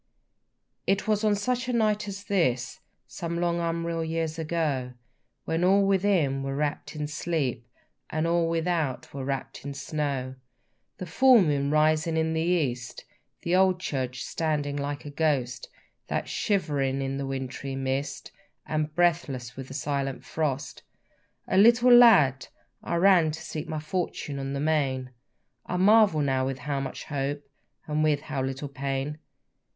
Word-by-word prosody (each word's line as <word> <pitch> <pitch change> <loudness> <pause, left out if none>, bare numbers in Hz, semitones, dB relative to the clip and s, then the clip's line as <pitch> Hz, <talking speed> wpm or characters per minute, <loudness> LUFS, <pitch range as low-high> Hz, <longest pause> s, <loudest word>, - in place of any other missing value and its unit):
It 195 +2 +1
was 215 0 +1
on 210 -1 +3
such 250 +4 -1
a - - 0
night 215 -3 +1
as 200 0 -6
this, 130 -12 0 0.3
Some 170 +4 -4
long 170 0 0
unreal 165 0 -1
years 160 0 -2
ago, 150 -6 -1 0.5
When 165 +2 -1
all 195 +2 +4
within 185 -8 +2
were 135 0 -3
wrapp'd 150 +2 -3
in 150 -1 -3
sleep, 145 -6 -2 0.4
And 155 +1 -1
all 170 0 +2
without 165 -5 -1
was 135 -1 -5
wrapp'd 135 -1 -4
in 140 0 -6
snow, 135 -2 -3 0.6
The 185 - -5
full 255 +8 +6
moon 140 -3 0
rising 155 +2 +2
in 160 0 +1
the 160 - 0
east, 145 -9 -1 0.4
The 170 +1 +1
old 185 -1 +4
church 130 -7 -3
standing 150 -3 -1
like 145 0 -4
a 145 - -6
ghost, 140 -5 -1 0.4
That, - - -2
shivering 140 -9 0
in 135 0 -3
the 140 0 -3
wintry 135 0 -4
mist, 135 +1 -3 0.3
And 155 0 -2
breathless 150 -8 0
with 135 -1 -7
the 135 - -9
silent 140 -1 -2
frost, 140 -3 -3 0.7
A 185 - +1
little 240 +3 +6
lad, 185 - +6 0.3
I - - -3
ran 175 -2 +5
to 160 +1 -5
seek 155 -1 -5
my 155 -1 -2
fortune 150 -3 -3
on 135 0 -4
the 140 - -2
main; 140 -4 0 0.6
I 180 - -2
marvel 205 -4 +5
now 130 -2 +1
with 135 -1 -3
how 140 0 -3
much 135 -1 -5
hope 145 0 -3 0.4
and 155 0 0
with 150 -2 +2
how 145 -3 -4
little 135 +2 -3
pain! 140 +2 -3
150 Hz, 155 wpm, -27 LUFS, 135-170 Hz, 0.7 s, full